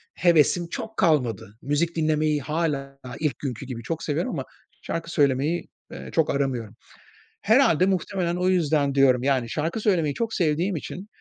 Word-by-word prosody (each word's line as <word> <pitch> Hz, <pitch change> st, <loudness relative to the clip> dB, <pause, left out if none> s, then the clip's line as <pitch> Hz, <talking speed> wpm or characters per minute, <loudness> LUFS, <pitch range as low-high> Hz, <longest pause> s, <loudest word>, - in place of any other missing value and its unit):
hevesim 170 Hz, 0 st, +3 dB
çok 220 Hz, +4 st, -6 dB
kalmadı. 120 Hz, -, +1 dB
Müzik 150 Hz, +4 st, 0 dB
dinlemeyi 155 Hz, -2 st, +1 dB
hâlâ 140 Hz, -2 st, -2 dB, 0.2 s
ilk 150 Hz, -2 st, -1 dB
günkü 135 Hz, -2 st, -5 dB
gibi, 120 Hz, -3 st, -7 dB
çok 160 Hz, +7 st, -4 dB
seviyorum 160 Hz, -, -1 dB
ama -, -, -3 dB, 0.4 s
şarkı 165 Hz, 0 st, -4 dB
söylemeyi, 145 Hz, +2 st, +1 dB, 0.2 s
eee, -, -, -8 dB
çok 160 Hz, -2 st, +1 dB
aramıyorum. 125 Hz, -6 st, -2 dB, 0.7 s
Herhâlde, 215 Hz, -, +4 dB
muhtemelen 185 Hz, -2 st, -1 dB
o 180 Hz, +1 st, +1 dB
yüzden 150 Hz, -6 st, +1 dB
diyorum 130 Hz, -3 st, +4 dB
yani, 130 Hz, -4 st, +1 dB
şarkı 160 Hz, -, -2 dB
söylemeyi 165 Hz, -9 st, +1 dB
çok 230 Hz, -1 st, -3 dB
sevdiğim 175 Hz, +3 st, +1 dB
için, 180 Hz, +5 st, -7 dB
155 Hz, 150 wpm, -24 LUFS, 140-175 Hz, 0.7 s, Herhâlde